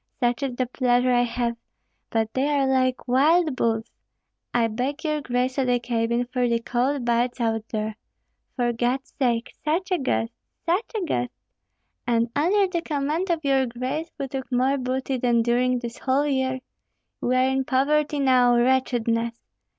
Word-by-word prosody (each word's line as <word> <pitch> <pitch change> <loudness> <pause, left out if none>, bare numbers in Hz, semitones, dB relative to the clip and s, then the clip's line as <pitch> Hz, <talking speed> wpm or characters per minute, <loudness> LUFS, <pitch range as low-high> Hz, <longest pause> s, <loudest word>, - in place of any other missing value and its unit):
Such 245 0 +1
is 270 -3 -2
the 255 - 0
pleasure 250 0 +2
I 245 - +4
have; 235 0 -1 0.5
but 225 -1 -1
they 265 +2 +1
are 285 -2 +2
like 260 -1 +1
wild 300 +4 +3
bulls. 225 -2 -1 0.6
I 240 -1 +2
beg 255 +7 -3
your 305 -2 -1
grace 250 0 0
to 270 - +2
the 245 -1 +2
cabin, 235 0 0
for 250 0 0
the 235 0 +2
cold 250 +3 -1
bites 240 +1 +1
out 225 -2 0
here. 215 -1 -2 0.6
For 240 -2 +1
God's 245 +3 -1
sake! 240 -3 +1
such 340 +5 -1
a 365 - +2
guest, 115 - -1 0.3
such 360 +7 0
a 405 -5 -1
guest! 245 -6 -1 0.8
And 235 0 +1
under 380 +7 +3
the 350 -2 -2
command 310 +4 -1
of 325 -3 -1
your 270 -2 +3
grace 255 +7 -3
we 275 - -3
took 265 0 -6
more 260 +3 +2
booty 260 +1 -2
than 240 -2 +2
during 250 +2 +2
this 240 -1 -6
whole 270 +2 +1
year. 260 -2 0 0.6
We 250 - +1
are 255 +1 +4
in 265 0 +1
poverty 290 +3 +1
now, 250 -3 +4
wretchedness! 240 -2 +1
255 Hz, 170 wpm, -24 LUFS, 240-275 Hz, 0.8 s, I